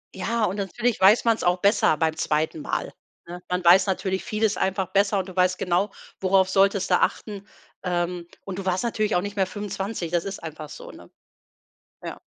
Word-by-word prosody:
Ja, 220 +4 0
und 190 - -2
natürlich 220 +4 -1
weiß 205 +6 +6
man 230 -1 +4
es - - -7
auch 175 +1 +2
besser 200 -6 +3
beim 160 0 0
2. 155 0 -1
Mal - - -3 0.3
ne? 175 +1 -8
Man 180 0 -1
weiß 180 +3 +6
natürlich 190 0 -1
vieles 215 0 0
einfach 190 -1 -1
besser 200 0 +2
und 185 - -4
du 185 - -10
weißt 180 0 +2
genau, 180 +3 0 0.3
worauf 190 0 +3
solltest 195 0 +2
du 180 - +5
achten. 200 -2 -2 0.4
Ähm, 175 -1 -2 0.2
und 190 -1 -6
du 195 - -5
warst 185 +3 0
natürlich 215 -2 0
auch 175 - +1
nicht 205 +1 -6
mehr 190 -2 +2
25, 200 -3 -5
das 175 -1 +1
ist 195 0 -5
einfach 155 -2 -8
so, - - -10
ne? - - -15 1.0
Ja. - - -6
190 Hz, 200 wpm, -24 LUFS, 180-200 Hz, 1.0 s, weiß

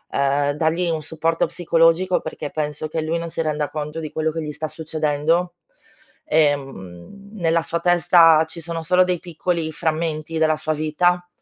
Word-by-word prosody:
uhm, 140 +1 +2
dagli 165 +3 0
un 160 -2 -1
supporto 160 +2 0
psicologico 170 +2 +2
perché 155 -2 -6
penso 150 0 -3
che 160 +1 -3
lui 160 +2 -1
non 170 0 -5
si 165 - -3
renda 150 -2 -1
conto 150 +1 -5
di 155 -2 -6
quello 160 0 -1
che 165 +1 -4
gli 150 - -4
sta 155 +1 -4
succedendo. 155 +2 -1 0.7
Ehm, 145 - -2
nella 165 -5 +1
sua 170 +1 -3
testa, 170 -2 +5
ci 170 +1 -9
sono 165 0 -4
solo 180 +3 +4
dei 180 -1 -1
piccoli 170 -1 -3
frammenti 160 0 -2
della 160 -1 +3
sua 155 0 -2
vita, 175 +4 0
160 Hz, 170 wpm, -21 LUFS, 155-170 Hz, 0.7 s, testa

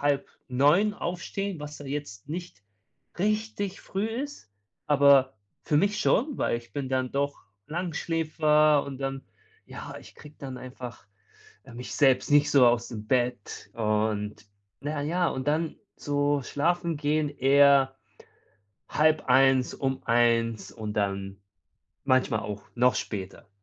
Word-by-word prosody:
8:30 145 +6 +1
aufstehen, 185 0 -4
was 150 0 -8
ja 145 - -9
jetzt 135 -5 -6
nicht 170 - -7 0.6
richtig 210 -1 -1
früh 195 +3 -3
ist, 250 - -6 0.4
aber 140 -3 +5 0.3
für 150 - +1
mich 200 +6 +2
schon, 275 +4 +1
weil - - +1
ich 120 0 -18
bin 140 -2 -3
dann 130 -1 -1
doch 140 +1 -1 0.3
Langschläfer 155 -3 +2
und 135 -2 -7
dann 135 0 -4 0.4
ja, - - -8
ich - - -15
kriege 150 +1 -13
dann 130 -2 -7
einfach, 125 -3 -9 0.6
äh, 115 - -13
mich 125 +1 -7
selbst 135 -2 +3
nicht 145 0 +5
so 140 -3 +7
aus 120 0 +3
dem 110 -2 -7
Bett 125 -1 -1
und 105 -1 -1 0.4
na 150 0 -2
ja, 170 +4 +1
und 130 -2 -4
dann 160 +1 0 0.2
so 145 -1 0
schlafen 170 +5 0
gehen 150 +1 0
eher 140 0 +4 1.0
0:30,, 135 -4 +3
um 135 -1 -2
1:00 115 -3 +2
und 105 -2 -6
dann 100 -1 -2 0.7
manchmal 130 -5 +2
auch 105 -2 -6
noch 125 +1 +4
später. 100 -1 -5
140 Hz, 130 wpm, -27 LUFS, 125-155 Hz, 1.0 s, so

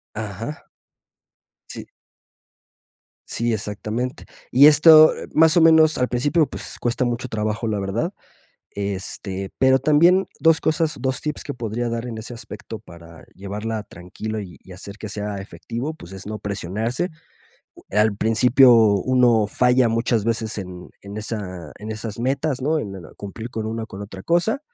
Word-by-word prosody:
Ajá. 110 +6 -6 1.0
Sí. - - -8 1.4
Sí, 120 0 -1
exactamente. 110 +4 -4 0.3
Y 140 +4 +8
esto 155 +1 +8 0.2
más 160 +1 +5
o 170 - +6
menos 160 -1 +6
al 125 - +1
principio 145 +6 +1 0.3
cuesta 120 +2 0
mucho 120 +1 -2
trabajo 110 0 -2
la 105 -1 -1
verdad, 105 - -2 0.6
este, 95 -1 -5
pero 130 0 +4
también 175 +5 +4
2 165 -1 +4
cosas, 160 0 0
2 130 -1 -1
tips 150 -1 -4
que 145 - -5
podría 120 -1 -3
dar 115 +1 -3
en 115 -2 -6
ese 115 +2 -8
aspecto 115 - -9
para 85 -1 -14
llevarla 105 +3 -4
tranquilo 105 +4 -7
y 95 -4 -10
hacer 100 +2 -10
que 105 - -7
sea 105 -1 -4
efectivo, 115 +8 -6
pues 95 - -13
es 95 0 -9
no 105 +1 -5
presionarse, 105 - -3 0.8
al 105 0 +2
principio 120 +4 +5
uno 115 +1 +4
falla 125 +3 +3
muchas 115 -1 0
veces 115 -1 -2
en 90 -2 -8
en 100 +1 -9 0.8
esas 110 0 -6
metas 135 +2 -1 0.2
en 100 -7 -6 0.2
cumplir 110 +4 -8
con 110 -2 -4
una 115 0 -3
u 110 - -10
otra 95 -2 -9
cosa, 175 +10 +1
115 Hz, 140 wpm, -22 LUFS, 105-130 Hz, 1.4 s, Y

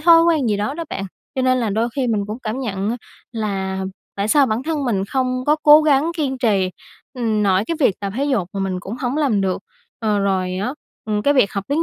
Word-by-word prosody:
thói 330 +1 +7
quen 315 -7 +2
gì 210 - +1
đó 210 +7 -2
đó 335 +1 -4
bạn. 195 - -3 0.3
Cho 260 - 0
nên 255 0 +3
là 225 -3 0
đôi 220 +4 +1
khi 265 -3 +1
mình 215 -3 0
cũng 215 +3 -5
cảm 225 +3 -3
nhận 200 -4 -2
á, 240 - -2 0.4
là 195 -4 -2 0.3
tại 200 +1 -1
sao 280 +4 +5
bản 220 +1 -1
thân 305 -1 -2
mình 200 -6 0
không 255 +2 -1
có 300 +1 +4
cố 300 +1 +8
gắng 300 +1 +3
kiên 275 -5 -1
trì, 200 -7 +2 0.4
ừm, 225 -4 0
nội 195 0 +3
cái 335 - -2
việc 210 -9 +2
tập 200 -1 -3
thể 275 - 0
dục 240 -11 0
mà 195 - -3
mình 190 -1 -2
cũng 200 +6 -6
hổng 255 +1 -2
làm 270 -10 +2
được. 190 -1 -1 0.4
Ờ, 215 -2 +1
rồi 185 -2 0
á, 225 +8 -2 0.3
ừm, 210 -1 -1
cái 285 +4 +3
việc 255 -7 +3
học 200 -1 -3
tiếng 295 +4 +1
225 Hz, 250 wpm, -20 LUFS, 200-275 Hz, 0.4 s, cố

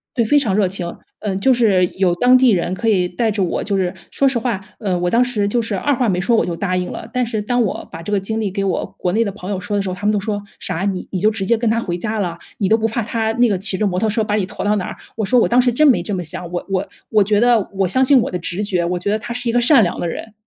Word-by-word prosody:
对， 235 - +2
非 290 +7 +4
常 215 -8 0
热 210 - +3
情， 180 -2 -3 0.2
嗯， 195 -3 -2
就 260 +3 +4
是， 205 -7 +3
有 185 -2 +2
当 250 +6 +5
地 255 -2 +4
人 180 -2 0
可 225 +4 -3
以 185 -5 +3
带 220 +6 -1
着 205 -2 0
我， 175 - -1
就 200 - -2
是 185 -2 0 0.2
说 275 - +1
实 265 -3 +2
话， 225 -5 -2 0.2
呃， 190 -5 -1
我 175 0 0
当 235 +5 +3
时 240 -5 +1
就 235 +4 +1
是 225 -2 -3
二 285 +9 0
话 245 -2 0
没 180 -2 0
说， 230 +3 +2
我 - - +2
就 170 - -3
答 185 0 -1
应 180 0 -2
了。 - - -7
但 250 -1 +1
是 220 -2 -2
当 245 +3 0
我 210 - -2
把 165 - -8
这 205 +5 -4
个 205 - +3
经 220 +3 -3
历 210 -3 -1
给 195 +1 -3
我 190 -3 -1
国 180 - -1
内 230 +4 +1
的 200 - -2
朋 195 -2 -8
友 190 - -2
说 205 +2 -4
的 200 - 0
时 190 - -3
候， 185 - -3
他 200 +3 -7
们 210 - +3
都 205 - +1
说： 205 0 -3 0.2
“啥？ 180 0 -3
你 195 -2 -2
你 185 - -2
就 210 +3 +3
直 205 -3 -3
接 235 +2 +2
跟 230 -1 0
他 230 +1 +1
回 175 -3 -3
家 215 +2 -3
了？ 170 -3 -3 0.2
你 195 - +1
都 220 - +5
不 225 0 0
怕 230 +2 -2
他 225 0 -1
那 240 -1 +3
个 190 -3 0
骑 195 -1 0
着 215 - 0
摩 180 -2 0
托 220 - +1
车 220 +1 0
把 210 0 -1
你 200 -3 0
驮 - - -6
到 210 +1 +2
哪 185 - -2
儿？” - - -6 0.2
我 220 - -1
说： 245 +6 +2
“我 - - +2
当 245 +1 +5
时 245 - +2
真 305 +5 +3
没 270 - +5
这 205 - -3
么 180 - -3
想， 170 +2 -5
我 175 0 -4
我 190 +1 -1 0.2
我 215 -1 +3
觉 205 +2 +2
得 240 -4 +3
我 195 -1 +1
相 260 +9 +3
信 275 0 +6
我 - - -3
的 180 - -3
直 175 +4 -2
觉， 180 -4 0
我 180 +1 -1
觉 200 +3 -2
得 215 - 0
他 235 - -6
是 245 -1 -2
一 - - +2
个 245 - +2
善 245 -1 +5
良 175 - -2
的 175 - -2
人。” 215 +6 -6
205 Hz, 360 characters per minute, -19 LUFS, 185-230 Hz, 0.2 s, 信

